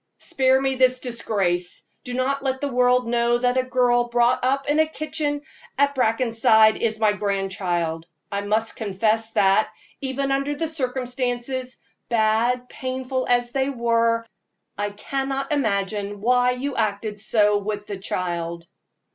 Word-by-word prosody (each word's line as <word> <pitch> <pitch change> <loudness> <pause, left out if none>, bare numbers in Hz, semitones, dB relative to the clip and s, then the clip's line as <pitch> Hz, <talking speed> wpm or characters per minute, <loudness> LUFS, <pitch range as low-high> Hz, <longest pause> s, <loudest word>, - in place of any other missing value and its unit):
Spare 260 0 +2
me 270 0 0
this 255 -1 +3
disgrace; 195 -8 -2 0.2
do 250 -1 -5
not 270 +2 0
let 265 -1 -1
the 285 0 -2
world 250 0 +3
know 235 0 +2
that 245 +1 +1
a 260 - +3
girl 245 -1 +2
brought 240 +1 +2
up 270 +2 +1
in 295 +1 +2
the 315 0 +4
kitchen 300 -2 -3 0.3
at 280 0 +3
Brackenside 225 -3 +4
is 220 -1 -1
my 215 -2 +3
grandchild. 185 -5 -2 0.2
I 200 0 -1
must 215 +2 0
confess 220 +1 0
that, 195 +2 +3 0.3
even 275 0 -2
under 275 +2 0
the 325 +2 -2
circumstances, 255 -2 -3 0.3
bad, 235 +2 +1
painful, 260 0 -3
as 245 0 +2
they 270 +1 0
were, 230 -2 +1 0.5
I 205 0 -2
cannot 270 +6 -3
imagine 205 -6 -1
why 250 +3 +3
you 265 +2 -4
acted 210 -1 -2
so 210 -1 +2
with 205 0 -4
the 205 -2 -5
child." 170 -3 -3
240 Hz, 145 wpm, -23 LUFS, 210-260 Hz, 0.5 s, the